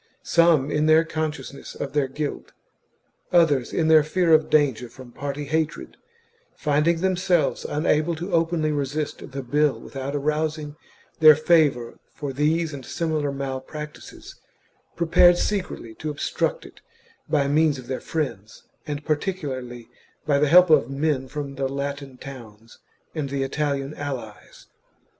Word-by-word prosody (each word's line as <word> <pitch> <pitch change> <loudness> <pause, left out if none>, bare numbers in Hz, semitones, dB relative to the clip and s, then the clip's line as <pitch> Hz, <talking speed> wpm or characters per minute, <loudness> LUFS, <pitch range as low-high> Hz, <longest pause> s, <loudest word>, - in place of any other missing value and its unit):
Some 165 -5 +3
in 150 +1 +1
their 160 +1 +6
consciousness 150 -4 -5
of 140 - -5
their 145 -2 +1
guilt, 145 +2 -5 0.8
others 150 -8 +3
in 160 - 0
their 160 -1 +7
fear 165 +2 +2
of 155 0 +4
danger 135 -6 +2
from 125 +1 -13
party 145 +3 -5
hatred, 160 +2 -2 0.6
finding 155 +2 +1
themselves 185 -2 +1
unable 155 +2 +1
to 175 +4 -6
openly 165 -2 +1
resist 145 +1 -3
the 135 0 -5
bill 145 +3 +1
without 135 +1 -6
arousing 150 +1 -2 0.4
their 155 -1 +9
favour 150 -7 +2 0.2
for 145 -2 -5
these 155 +3 0
and 135 -2 -7
similar 155 -1 -2
malpractices, 140 +2 -7 0.6
prepared 175 +1 +5
secretly 185 - -3
to 155 +6 -6
obstruct 145 - -2
it - - -15 0.5
by 140 -2 +2
means 150 0 +2
1 - - -7
of - - -18
their 130 - -4
friends, 115 -10 -4 0.2
and 145 -1 -5
particularly 135 - -3 0.4
by 145 -2 +2
the 150 - +3
help 180 +1 +7
of 140 -6 +5
men 135 -1 -1
from 140 +1 -5
the 135 -1 -1
Latin 140 -1 -5
towns 115 -5 -12 0.3
and 150 -4 -3
the 135 0 -1
Italian 140 0 -2
allies. 130 -8 -7
150 Hz, 140 wpm, -24 LUFS, 135-155 Hz, 0.8 s, their